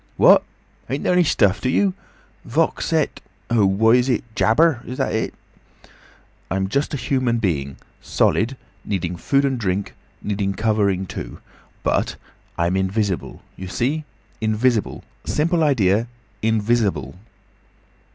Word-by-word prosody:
"What! - - +7 0.5
Ain't 135 +2 -2
there - - +2
any 180 0 +5
stuff 100 - +2
to 125 - 0
you. 195 +7 +2 0.5
Vox - - 0
et—what 110 0 +1
is 125 +1 +2
it?—jabber. 120 +5 +2
Is 125 - -5
it - - -8 0.4
that?" - - -29 0.6
"I - - -1
am 95 0 0
just 140 +6 0
a - - -2
human 130 -3 0
being—solid, 95 - -1 0.3
needing 90 -3 -2
food 140 +10 +1
and 135 -2 0
drink, 100 -2 -2 0.3
needing 100 -1 -1
covering 105 -4 +1
too—But - - -4 0.4
I'm 85 +2 +1
invisible. 95 0 -1
You 95 - -7
see? 140 +11 -1 0.4
Invisible. 110 +1 0 0.2
Simple 160 - +1
idea. 115 -6 +2 0.3
Invisible." 110 -3 0
110 Hz, 115 wpm, -21 LUFS, 95-130 Hz, 0.6 s, What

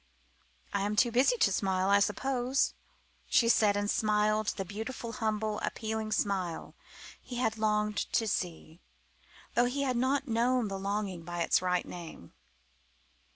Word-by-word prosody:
"I - - 0
am 205 +1 -1
too 240 +2 +3
busy 260 - +3
to 200 - +3
smile, 190 0 +1
I 200 - +6
suppose!" 250 +5 +1 0.5
she 230 - +4
said, 210 -3 +4
and 205 0 -1
smiled 215 0 +1
the 195 - -3
beautiful, 225 +4 -5
humble, 215 -2 -1
appealing 220 -1 -3
smile 190 -5 -1 0.5
he 250 - -8
had 240 -3 +1
so 220 - -11
longed 210 -1 0
to 225 - +1
see 170 -4 -4
again, - - -28
though 245 +1 +3
he 280 +2 -1
had 255 -3 0
not 270 +3 +1
known 235 0 +1
the 195 0 -4
longing 200 -2 -2
by 175 +1 -4
its - - +3
right 180 -1 0
name. 165 - -10
215 Hz, 155 wpm, -30 LUFS, 195-240 Hz, 0.5 s, I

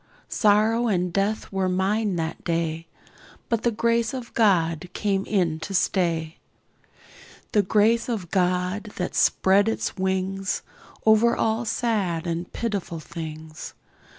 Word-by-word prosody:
Sorrow 220 +2 +3
and 180 -4 0
death 200 +2 -1
were 190 -1 0
mine 195 +2 0
that 165 -1 -3
day, 165 -1 -2 0.6
But 230 -2 +1
the 240 - +2
Grace 235 +2 +1
of 250 -2 -7
God 175 -6 +2
came 195 -2 0
in 175 -6 +1
to 190 +5 -5
stay; 170 -4 0 1.1
The 210 - +4
Grace 220 +5 +2
of 195 -8 -3
God 180 +2 0
that 180 - -3
spread 200 +3 +3
its 225 - -3
wings 190 +1 -1 0.4
Over 220 +2 +5
all 225 +2 0
sad 205 -8 -1
and 170 +1 -3
pitiful 200 -7 -3
things. 155 -1 -8
195 Hz, 125 wpm, -24 LUFS, 170-220 Hz, 1.1 s, Over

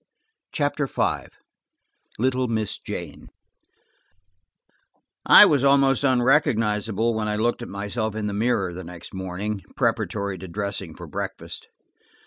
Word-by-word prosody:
CHAPTER 145 -2 -1
V - - -1 0.9
LITTLE 130 +2 +1
MISS 110 -3 -2
JANE - - -7 2.0
I - - +10
WAS 140 -3 +3
almost 135 -1 +4
unrecognizable 115 -5 +2
when 110 -1 -2
I 105 - -1
looked 120 +3 0
at 120 - -6
myself 105 +2 -3
in 110 -1 -3
the 105 - -2
mirror 100 -4 0
the 95 +2 -7
next 85 0 -10
morning, 95 +2 -4
preparatory 100 -3 -1
to 95 - -8
dressing 100 -2 -5
for - - -9
breakfast. - - -6
110 Hz, 120 wpm, -24 LUFS, 100-125 Hz, 2.0 s, I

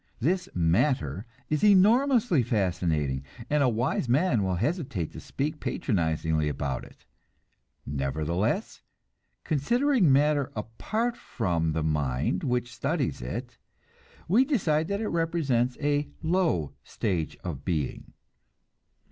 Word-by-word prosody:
This 180 +8 0
"matter" 90 - +1 0.2
is 150 -1 -1
enormously 210 - +5
fascinating, 90 - 0 0.3
and 150 0 +3
a 130 - +4
wise 120 +2 -1
man 130 - +3
will 95 -2 0
hesitate 125 - -2
to - - -9
speak 150 +2 -3
patronizingly 80 - 0
about 70 -2 -3
it. - - -16 0.8
Nevertheless, 80 - -1 0.6
considering 235 - +2
matter 145 0 +3
apart 215 - -2
from 85 - -1
the 80 0 -1
mind 75 +1 0
which 125 -2 -1
studies 140 - -1
it, 60 - -6 0.7
we 220 +9 +5
decide 165 - +1
that 200 +2 -2
it 220 - -1
represents 150 -8 0
a 145 0 0
low 160 - +1
stage 90 -7 -2
of 75 -6 -5
being. 80 -7 -3
125 Hz, 115 wpm, -27 LUFS, -, 0.8 s, enormously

